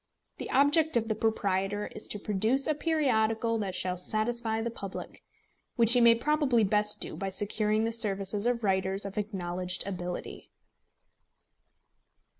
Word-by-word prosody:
The - - -6
object 290 +2 +3
of 225 -1 -2
the - - +2
proprietor 205 -2 -1
is 215 - -6
to - - -3
produce 215 +7 0
a 310 - +1
periodical 230 -8 0
that 195 -3 -4
shall 185 0 -2
satisfy 220 +4 -2
the 230 +1 -3
public, 195 -4 -8 0.5
which 235 0 +8
he 245 - +4
may 235 0 +7
probably 270 -2 +1
best 210 +1 +2
do - - -5
by 195 +4 -4
securing 210 +2 +1
the 225 - -1
services 205 -1 0
of 240 -1 -1
writers 190 0 0
of 200 +1 -4
acknowledged 180 -3 -4
ability. 180 -2 -6
215 Hz, 145 wpm, -29 LUFS, 195-235 Hz, 0.5 s, which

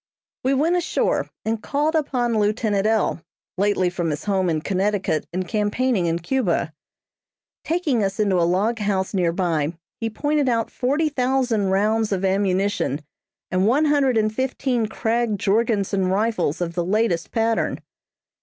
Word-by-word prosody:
We 265 +2 +2
went 320 +6 +2
ashore 355 -1 0 0.2
and 220 0 -1
called 295 +6 0
upon 250 -7 0
lieutenant 210 -1 +1
L., 220 -6 +1 0.3
lately 200 -1 +1
from 175 -2 -2
his 150 -1 -3
home 190 -3 +1
in 155 -2 0
Connecticut 195 -3 -1
and 185 +1 -3
campaigning 210 -2 0
in 165 0 +1
Cuba. 175 -4 -1 0.9
Taking 315 - 0
us 195 +1 -2
into 195 -4 +2
a 170 - +2
log 215 +6 +1
house 200 -2 -1
near 180 -3 +2
by, 165 -3 -1 0.2
he 225 - -1
pointed 290 +4 0
out 230 -2 0
forty 285 +5 0
thousand 250 -7 0
rounds 215 +3 +1
of 195 -1 0
ammunition 195 - 0 0.5
and 185 +2 +2
one 280 +7 +3
hundred 280 -5 +3
and 215 0 +1
fifteen 255 -1 -1
Krag 225 -1 -1
Jorgensen 200 -2 +1
rifles 190 -5 0
of 170 -1 -2
the 175 - -1
latest 190 -2 0
pattern. 225 -1 0
210 Hz, 150 wpm, -22 LUFS, 185-245 Hz, 0.9 s, one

